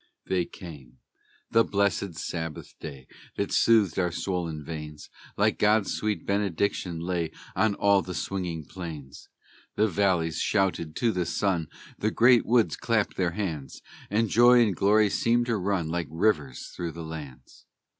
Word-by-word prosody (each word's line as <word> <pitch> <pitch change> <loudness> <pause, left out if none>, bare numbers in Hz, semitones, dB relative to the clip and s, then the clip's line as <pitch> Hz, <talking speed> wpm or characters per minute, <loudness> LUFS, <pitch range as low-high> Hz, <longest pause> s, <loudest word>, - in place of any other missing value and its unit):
They 90 -2 0
came: 70 -10 -12 0.5
the 115 0 +5
blessed 100 -3 0
Sabbath 80 -1 -5
day, 70 -4 -8 0.3
That - - -2
soothed 105 -7 +4
our 90 -2 +1
swollen 85 -4 -3
veins, 75 -1 -8 0.3
Like - - +2
God's 105 -1 +3
sweet 105 -1 -2
benediction, 100 -3 -1
lay 85 -2 -1 0.3
On 110 -2 +2
all 100 -1 +4
the 90 +1 -6
singing 90 -5 -3
plains; 80 -7 -9 0.5
The 110 - +3
valleys 90 -4 +1
shouted 95 -6 0
to 115 - +1
the 90 -4 -2
sun, 90 -3 0 0.3
The 110 - +1
great 120 +2 +4
woods 115 -1 +3
clapped 110 -3 0
their 90 -2 0
hands, 80 -9 -4 0.3
And 110 +3 +1
joy 120 +3 +6
and 105 -5 0
glory 105 +2 +3
seemed 120 +1 +2
to 120 -1 0
run 95 -3 -1
Like 85 -1 -2
rivers 80 - 0
through 85 -2 -4
the 85 - -7
lands. 70 -6 -10
90 Hz, 150 wpm, -27 LUFS, 80-105 Hz, 0.5 s, joy